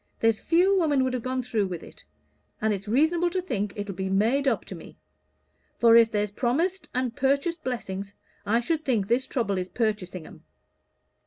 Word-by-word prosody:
There's 225 -1 +2
few 370 +4 +3
women 290 -6 +2
would 260 0 -1
have 250 - -2
gone 255 +1 -2
through 220 -5 0
with 175 -3 -6
it; - - -13 0.6
and 220 0 +1
it's 195 0 -5
reasonable 320 +9 +2
to 370 +2 -1
think 210 - -2
it'll 205 -2 -4
be 190 +1 -3
made 230 +9 +2
up - - +1
to - - -8
me; - - -12 0.8
for 230 -1 +6
if 230 -1 +7
there's 210 -2 -1
promised 300 - -1
and 250 -2 -1
purchased 280 +5 0
blessings, 200 -6 -4 0.3
I 225 +3 +1
should 315 +4 -1
think 225 -9 0
this 245 +4 +1
trouble 200 -7 -1
is 180 0 -4
purchasing 195 -7 -2
'em. - - -14
235 Hz, 185 wpm, -26 LUFS, 205-280 Hz, 0.8 s, if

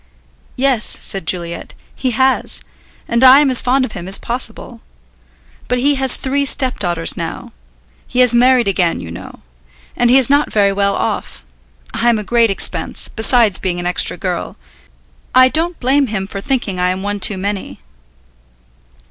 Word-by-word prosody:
"Yes," 255 -4 0
said 195 -5 -4
Juliet, 170 -1 -4 0.2
"he 260 - -2
has, 260 +2 +1 0.5
and 235 +2 0
I 260 +2 +8
am 290 -2 +2
as 255 - +5
fond 255 +2 +1
of 225 - -9
him 180 -2 -8
as 195 - +3
possible. 240 -1 -5 0.9
But 250 - -1
he 280 +4 +2
has 265 -2 +2
three 280 +1 -2
stepdaughters 200 -12 0
now; - - -7 0.5
he 250 - +1
has 250 -2 +4
married 245 -1 +3
again, 180 - 0
you 85 -1 -9
know. 90 +3 -11 0.5
And 240 - +2
he 255 - +6
is 260 -3 +4
not 285 +2 +1
very 200 -2 +2
well 200 0 0
off. - - -4 0.5
I 240 - +1
am 235 - +2
a 210 - -4
great 230 +2 +2
expense, 195 - +1
besides 220 -3 +2
being 180 -2 -3
an 175 - -5
extra 180 0 +2
girl. - - -5 0.8
I 255 0 +6
don't 330 +4 -2
blame 270 +2 +1
him 200 -4 -3
for 195 0 -7
thinking 230 -7 -2
I 180 0 +1
am 185 +1 -3
one 205 0 -3
too 195 +1 +1
many." 200 +1 -5
235 Hz, 170 wpm, -16 LUFS, 195-260 Hz, 0.9 s, I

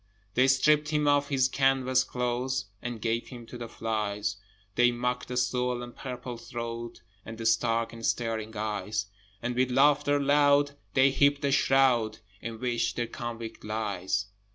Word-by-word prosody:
They 130 +4 +4
stripped 150 +3 +4
him 150 -1 +1
of 145 0 +3
his 130 -2 +3
canvas 130 -1 +2
clothes, 125 -1 -2 0.2
And 120 -2 -5
gave 115 +1 -1
him 120 -3 -10
to 120 - -11
the 120 -1 -6
flies; 105 -2 -2 0.4
They 120 +3 +4
mocked 125 +1 -2
the 125 - -4
swollen 125 -1 -1
purple 125 -2 -6
throat 115 -1 -6 0.2
And 115 0 -8
the 115 - -6
stark 115 0 +2
and 115 0 -10
staring 110 -2 -1
eyes: 105 0 -2 0.4
And 120 0 -2
with 130 +1 +2
laughter 145 +2 +4
loud 145 0 +4 0.2
they 135 0 +5
heaped 140 +1 +3
the 140 - +2
shroud 130 -5 +3 0.2
In 115 0 -6
which 120 -1 -1
their 120 - -1
convict 115 -1 -7
lies. 100 -2 -2
120 Hz, 155 wpm, -28 LUFS, 115-135 Hz, 0.4 s, they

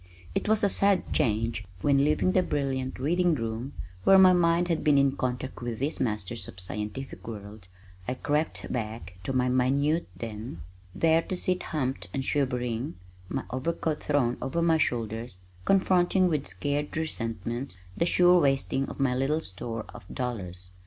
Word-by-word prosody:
It - - -1
was 220 -1 +3
a - - +6
sad 195 -1 +3
change 115 -5 +1 0.2
when, 140 -1 +4
leaving 150 +5 +2
the 185 - +4
brilliant 135 -5 -2
reading 175 +5 +2
room 115 +2 -4 0.3
where 195 - +7
my 185 -1 +8
mind 170 0 +3
had 165 -3 0
been 150 -2 +5
in 140 0 +3
contact 130 0 -3
with 120 -2 -3
these 140 +6 -1
masters 110 -2 -2
of 95 - -10
scientific 105 +9 -3
world, 105 -3 -8 0.4
I 125 - -1
crept 150 +4 -1
back 110 -6 -5
to - - -1
my 130 -1 +2
minute 140 +6 +2
den, 110 -4 -6 0.3
there 165 0 +4
to 185 - -4
sit 180 0 0
humped 135 -4 -2
and 135 -1 -1
shivering 125 -4 -1 0.3
(my 135 - -2
overcoat 150 +4 -1
thrown 130 -5 +1
over 170 +6 -1
my 165 -1 +4
shoulders) 115 -4 -2 0.3
confronting 185 -1 +3
with 150 - -1
scared 145 +11 -2
resentment 115 - -3 0.2
the 170 - +1
sure 180 0 +5
wasting 135 -1 +1
of - - -9
my 135 -2 +2
little 135 +5 +1
store 115 - -5
of 105 - -10
dollars. 95 -8 -4
135 Hz, 160 wpm, -28 LUFS, 115-160 Hz, 0.4 s, my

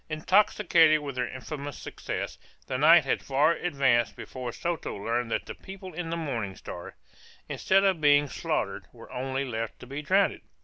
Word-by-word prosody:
Intoxicated 165 -1 +4
with 140 -1 -5
their 125 0 -1
infamous 140 +1 -6
success, - - -5 0.3
the 130 -1 -3
night 160 +1 +7
had 135 - 0
far 140 +4 +3
advanced 130 -11 +1
before 125 -2 -6
Soto 170 +5 -3
learned 115 +4 -2
that - - -1
the - - -6
people 190 -1 -10
in 165 0 -4
the 170 - -2
Morning 115 - -3
Star, 85 - -9 0.5
instead 195 +1 +2
of 190 -5 +2
being 145 0 +5
slaughtered, 140 - -3
were - - -14
only 130 +2 -2
left 115 -3 -4
to - - -10
be 140 +4 -5
drowned. 190 +6 +2
145 Hz, 170 wpm, -28 LUFS, 125-165 Hz, 0.5 s, night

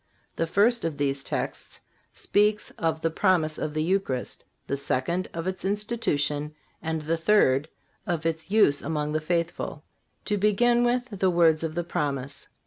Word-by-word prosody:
The 165 - -1
first 225 +7 +3
of 160 -3 -2
these 140 -1 -1
texts - - -4 0.3
speaks 210 +1 +1
of 160 -1 -2
the 165 - 0
promise 160 -3 +2
of 155 - -3
the 155 - +1
Eucharist, 170 -8 -1 0.2
the 140 - -1
second 140 +6 -1
of 165 0 -5
its 185 0 -3
institution 155 -8 -1 0.3
and 160 -1 -2
the 165 +2 0
third 160 -5 +3 0.4
of 170 -3 -2
its 160 +1 -2
use 200 -9 +4
among 150 0 -2
the 155 0 0
faithful. 170 +1 -2 0.4
To 210 - 0
begin 235 +4 +3
with 245 +1 +1
the 190 - +3
words 165 -2 +4
of 160 -1 -3
the 175 - -1
promise. 140 -4 -3
165 Hz, 160 wpm, -26 LUFS, 150-195 Hz, 0.4 s, use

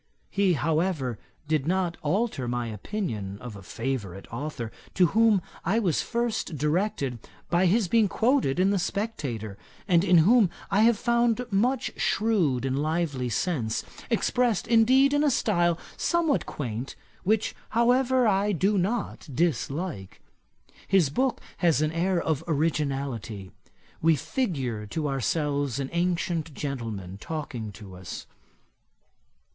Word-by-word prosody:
He, 200 -2 +3
however, 155 - 0 0.3
did 155 -2 0
not 180 -1 +1
alter 155 - 0
my 120 0 -1
opinion 105 - -4
of 120 -1 -8
a 100 - -10
favourite 100 -2 -4
authour, 120 -3 -4 0.2
to 180 - +5
whom 220 -4 +4 0.2
I 195 +6 +1
was 190 -9 +1
first 235 -8 -2
directed 150 - 0 0.3
by 175 +2 +4
his 205 +2 +3
being 220 +2 +4
quoted 230 - +1
in 190 +2 +4
The 200 - +1
Spectator, 145 - -3 0.3
and 175 -3 +4
in 185 -2 +5
whom 225 -2 +5 0.2
I 200 +1 +4
have 235 -2 +4
found 235 +1 +1
much 235 +6 +1
shrewd 180 - +1
and 135 +1 0
lively 155 -5 -1
sense, 120 - -1 0.3
expressed 235 -1 +1
indeed 255 +5 +5
in 290 +1 +3
a 300 - +4
style 175 -9 +2 0.2
somewhat 335 -5 +1
quaint, 120 -2 -5 0.3
which, 220 +3 +1 0.2
however, 250 +2 +3
I 205 0 +2
do 195 +3 +2
not 200 -3 -2
dislike. 145 - -2 0.7
His 180 -8 +3
book 260 - 0 0.2
has 170 -5 +3
an 155 - 0
air 175 +2 +1
of 160 -4 -1
originality. 135 - -2 0.5
We 165 0 +5
figure 140 - -2
to 150 +7 -2
ourselves 140 0 -1
an 135 -1 -3
ancient 170 -3 -1
gentleman 110 -9 -5
talking 125 -7 -5
to 95 0 -11
us. 90 0 -7
165 Hz, 130 wpm, -27 LUFS, 130-210 Hz, 0.7 s, to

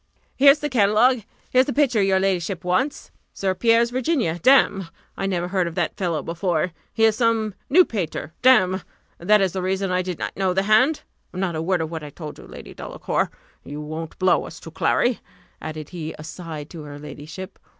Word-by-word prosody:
"Here's 280 +2 +7
the 295 - -3
catalogue; 235 +1 +3 0.3
here's 255 +1 +4
the 280 - -1
picture 260 -7 +2
your 195 -1 +3
ladyship 190 -1 -1
wants. 185 +11 -1 0.2
St. 190 -1 -1
Pierre's 235 0 +4
Virginia: 250 - 0
damme! 205 -8 +4 0.3
I 195 - -2
never 180 -2 -1
heard 185 -2 0
of 170 - -6
that 175 -3 -1
fellow 170 -5 -2
before 170 0 -1 0.2
he 225 - 0
is 220 -1 +5
some 225 -3 +1 0.2
new 350 +6 +6
painter, 170 -6 -4
damme! 190 -8 +5 0.4
that 210 +4 +4
is 190 -3 +1
the 190 - -2
reason 190 +1 -1
I 180 0 +1
did 180 -2 -4
not - - -4
know 190 -2 0
the 190 - +2
hand. 255 +9 +3 0.3
Not 185 -2 -1
a 155 - -2
word 175 +1 0
of 160 0 -4
what 160 -2 -5
I 150 - -7
told 150 +1 -9
you, - - -12
Lady - - -11
Delacour - - -2 0.3
you 145 +1 -7
won't 155 +2 -6
blow 185 0 +2
us - - -10
to - - -10
Clary," 240 -1 +1 0.4
added 155 -1 -6
he 160 -3 -6
aside 155 -1 -8
to 165 - -8
her 145 -1 -9
ladyship. 150 +5 -9
190 Hz, 195 wpm, -23 LUFS, 165-225 Hz, 0.4 s, Here's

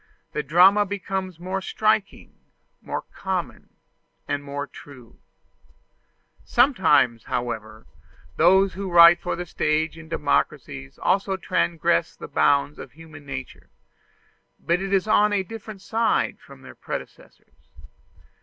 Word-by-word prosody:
The 150 - -2
drama 180 +8 +5
becomes 190 -3 -5
more 185 +2 -3
striking, 215 +1 -1 0.4
more - - -5
common, - - -4 0.6
and 145 0 -2
more 145 0 -5
true. 130 -6 -15 1.2
Sometimes, 165 - +3
however, 110 -3 -5 0.5
those 190 +3 +4
who 195 0 -5
write 170 0 +7
for 180 - -2
the 175 - -5
stage 160 0 -1
in 160 0 -13
democracies 70 - -2
also 195 0 0
transgress 170 - 0
the - - -9
bounds 140 - +1
of - - -10
human 155 -2 -14
nature 135 -2 -8 0.9
but 170 +2 0
it 195 0 -4
is 195 +1 +1
on 210 -1 +3
a 195 -2 +1
different 215 -1 -10
side 225 0 0
from - - -16
their - - -11
predecessors. - - -10
175 Hz, 120 wpm, -23 LUFS, 145-195 Hz, 1.2 s, write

